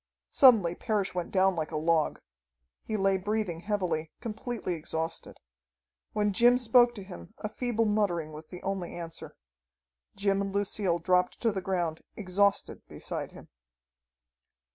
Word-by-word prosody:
Suddenly 220 -11 +6
Parrish 205 -1 -1
went 180 -1 -3
down 190 -1 +3
like 155 -2 -2
a 155 - -3
log. 160 0 +1 0.6
He 215 - -3
lay 195 -1 +2
breathing 205 -3 -2
heavily, 175 -5 -2
completely 225 -3 -4
exhausted. 160 0 -4 0.8
When 210 -1 +1
Jim 240 +4 +5
spoke 240 0 +4
to 200 - -7
him 85 - -11
a - - -4
feeble 230 +1 -1
muttering 195 -7 0
was 155 +1 -10
the 180 - -10
only 195 -3 -3
answer. 165 -1 -8 0.8
Jim 195 0 +1
and 195 0 -2
Lucille 200 -3 0
dropped 180 +1 +1
to 230 - +2
the 195 -2 -3
ground 175 -4 -2 0.2
exhausted 200 0 +1
beside - - -6
him. - - -13
195 Hz, 140 wpm, -29 LUFS, 170-210 Hz, 0.8 s, Suddenly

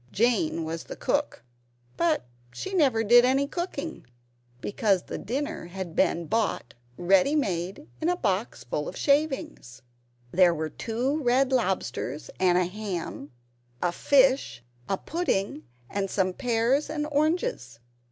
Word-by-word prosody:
Jane 240 - +1
was 165 +1 -5
the - - -7
Cook; - - -1 0.5
but 330 -2 +1 0.3
she 385 - -6
never 265 -11 +3
did 240 +3 +7
any 265 +2 +3
cooking, 330 - -5 0.5
because 200 - +1
the - - -6
dinner 285 - -3
had 180 -2 -6
been 170 0 +2
bought 215 - -1 0.2
ready 195 - +4
made, 195 - -2
in 320 - +2
a 355 - +2
box 200 - -1
full 150 +5 -3
of - - -6
shavings. 280 - 0 0.5
There 175 -1 +5
were 155 -1 -3
two 250 - -1
red 260 +1 +3
lobsters 180 - -1
and 180 -1 +4
a 180 - +3
ham, 180 -7 -5 0.5
a 175 - +1
fish, 260 - +3 0.3
a 195 - +1
pudding, 195 - -2 0.2
and 195 +4 -2
some 185 -1 0
pears 245 +5 +1
and 300 -1 -2
oranges. 300 - 0
225 Hz, 135 wpm, -27 LUFS, 175-280 Hz, 0.5 s, did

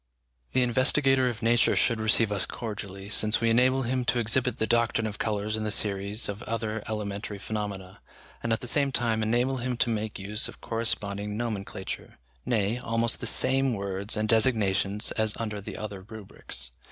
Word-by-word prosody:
The 130 - +3
investigator 130 +1 +3
of 115 -1 -6
nature 115 +1 +3
should 115 -3 +2
receive 110 0 +3
us 100 -2 +2
cordially, 100 -3 -6
since 105 +1 +2
we 115 0 +2
enable 130 +3 +3
him 130 +1 -1
to 125 0 +1
exhibit 120 +2 +1
the 110 - 0
doctrine 115 0 +1
of 105 -2 -5
colours 110 -1 -1
in 110 - -3
the 105 - -1
series 100 +1 +2
of 100 +2 -5
other 110 -1 -2
elementary 105 -1 -4
phenomena, 100 -2 -5 0.4
and 115 - -2
at 110 - +1
the - - -5
same 140 +2 +2
time 115 -3 +1
enable 120 +4 +1
him 125 0 -2
to 120 - +2
make 110 -1 -3
use 105 +3 -1
of - - -10
a - - -28
corresponding 105 -3 -2
nomenclature, 105 -5 -5 0.3
nay, 110 0 +1
almost 115 0 0
the - - -1
same 135 -1 +2
words 100 +1 -2
and 110 0 0
designations 105 -4 +2
as 110 -1 0
under 105 -3 -4
the - - -7
other 105 -3 -6
rubrics. 100 - -5
110 Hz, 180 wpm, -27 LUFS, 105-120 Hz, 0.4 s, The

